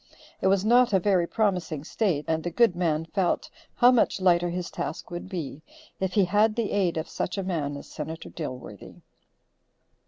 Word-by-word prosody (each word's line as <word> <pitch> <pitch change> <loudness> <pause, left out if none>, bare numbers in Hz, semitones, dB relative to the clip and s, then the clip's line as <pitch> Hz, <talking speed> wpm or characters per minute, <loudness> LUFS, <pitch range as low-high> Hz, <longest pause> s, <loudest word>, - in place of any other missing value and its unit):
It - - +2
was 195 +1 +3
not 240 0 +5
a 190 - +5
very 185 -2 +2
promising 180 -9 -1
state, 165 -4 -1
and 160 0 0
the 175 - -2
good 210 +1 +3
man 165 -3 0
felt 180 +2 -1 0.2
how 245 0 +6
much 240 -5 +2
lighter 175 -2 +3
his 180 0 -4
task 160 - -5
would 175 +2 -6
be, 155 -6 -5 0.4
if 190 -1 -1
he 200 -2 +4
had 210 +4 +3
the 230 -3 -1
aid 185 -5 +1
of 160 - -3
such 185 - -3
a 195 - -1
man 150 -6 -2
as - - -10
Senator 160 +2 -7
Dilworthy. 125 - -8
180 Hz, 185 wpm, -26 LUFS, 160-200 Hz, 0.4 s, how